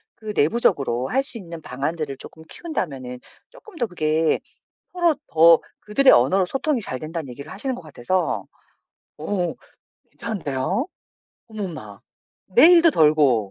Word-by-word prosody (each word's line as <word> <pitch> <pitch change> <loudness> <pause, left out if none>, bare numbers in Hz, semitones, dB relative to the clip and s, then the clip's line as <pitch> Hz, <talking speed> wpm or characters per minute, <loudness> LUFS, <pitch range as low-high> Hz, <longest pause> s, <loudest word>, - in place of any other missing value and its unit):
그 215 -1 -7
내부적으로 140 - +1
할 265 +4 +1
수 245 - -9
있는 170 -5 -9
방안들을 145 +2 -4
쪼끔 160 +4 -11
키운다면은 135 - -5 0.3
쪼끔 440 -5 -16
더 240 - 0
그게 160 -2 +1 0.5
‘서로 345 -3 +2
더 165 0 +6 0.2
그들의 260 +6 +4
언어로 180 +10 +4
소통이 270 +3 -1
잘 130 - -3
된다.‘는 160 0 -6
얘기를 140 +5 -9
하시는 255 +7 -3
것 245 - -9
같아서 155 - -2 0.7
어 175 +3 -2 0.6
괜찮은데요. 190 - -3 0.6
어머나. 160 - -7 0.5
내 250 - +6
일도 335 -1 +7
덜고 150 - +3
165 Hz, 295 characters per minute, -22 LUFS, 140-230 Hz, 0.7 s, 일도